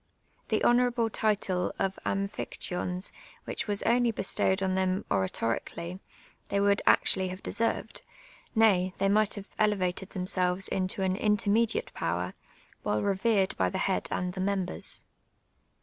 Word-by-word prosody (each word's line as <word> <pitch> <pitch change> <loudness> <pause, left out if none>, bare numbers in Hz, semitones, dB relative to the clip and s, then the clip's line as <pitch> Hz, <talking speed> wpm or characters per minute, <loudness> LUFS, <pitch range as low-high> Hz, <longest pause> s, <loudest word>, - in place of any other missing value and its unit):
The - - 0
honourable 240 -2 +3
title 200 -5 0
of 190 0 -1
" - - -26
.^buphictyons,'* 185 -1 -2 0.3
which - - -3
was 205 -1 0
only 240 0 +3
bestowed 190 -2 +1
on 190 -1 +1
them 190 +1 0
oratorically, 115 - -2 0.5
they 200 - +1
would 200 0 +3
actually 190 -1 +5
have 185 +2 -7
desers^ed, 230 0 -2 0.5
nay, 190 -5 +4
they 195 - +1
might 210 +1 +3
have 200 -1 -8
elevated 190 -3 +1
them 180 -2 -4
selves 185 +1 0
into 190 +1 0
an 185 0 +1
intermediate 210 +2 +1
power, 90 +2 -2 0.5
while 105 0 0
revered 195 0 +1
by 90 -1 +2
the - - -3
head - - 0
and 180 0 -2
the 185 - -4
members. 190 -1 -1
190 Hz, 140 wpm, -29 LUFS, 185-210 Hz, 0.5 s, actually